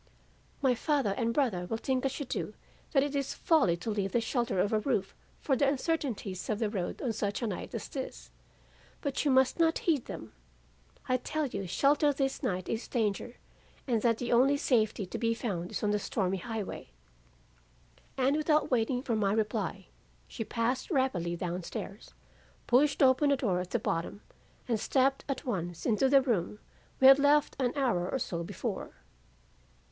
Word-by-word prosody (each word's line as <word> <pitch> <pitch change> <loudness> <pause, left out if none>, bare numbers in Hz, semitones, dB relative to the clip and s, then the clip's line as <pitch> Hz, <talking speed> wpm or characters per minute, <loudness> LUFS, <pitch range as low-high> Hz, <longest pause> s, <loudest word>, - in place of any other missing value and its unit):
'My 260 -2 +4
father 275 -3 0
and 230 +1 0
brother 225 -10 0
will 225 - -2
think 255 +2 -1
as 270 +2 -2
you 285 - -3
do - - -4 0.4
that 270 -2 +4
it 285 0 -3
is 275 -1 -2
folly 295 - +3
to 200 +6 -4
leave 200 -2 -2
the 240 - +3
shelter 235 -3 -1
of 205 +4 +1
a 215 - +3
roof 210 -5 -1 0.3
for 270 - +1
the 280 +2 +2
uncertainties 260 - -2
of 215 - +1
the 215 -2 -1
road 185 -5 -3
on 240 -4 0
such 205 +2 -2
a - - +1
night 205 -5 -4
as - - -4
this, - - -7 0.7
but 280 -2 -1
you 295 - +2
must 265 +3 +3
not 325 0 +3
heed 305 -8 +2
them. 110 - -8 0.7
I 255 - +2
tell 310 +4 -2
you 200 -7 -4
shelter 290 - +3
this 270 -1 -1
night 185 -1 -2
is 225 +1 -3
danger, 230 +1 -1 0.5
and 235 -5 +1
that 230 -1 +2
the 245 - -3
only 265 +4 +4
safety 220 -7 +1
to 180 - -6
be 230 -1 +1
found 185 -7 -3
is - - -4
on 210 - +2
the 210 - +1
stormy 195 -2 -1
highway.' 220 +1 -5 1.3
"And 270 +2 +2
without 305 -1 +2
waiting 250 +1 +1
for 235 - -1
my 205 -2 +1
reply, 210 -3 -1 0.4
she 225 - -5
passed 235 +4 -1
rapidly 230 - 0
down 175 +1 -3
stairs, 195 +4 -8 0.5
pushed 280 +4 +3
open 265 +2 +5
a 280 - +3
door 195 -8 0
at 180 0 -4
the 240 - +1
bottom, 200 -2 -3 0.4
and 230 -3 0
stepped 270 +4 +1
at 275 - -3
once 175 -8 -3
into 245 +3 +3
the 275 -1 +6
room 210 -6 -1 0.4
we 265 - +4
had 270 +1 +9
left 290 +1 +3
an 250 -2 +1
hour 235 -11 +1
or - - 0
so 170 -9 -3
before. - - -5
235 Hz, 185 wpm, -30 LUFS, 200-270 Hz, 1.3 s, had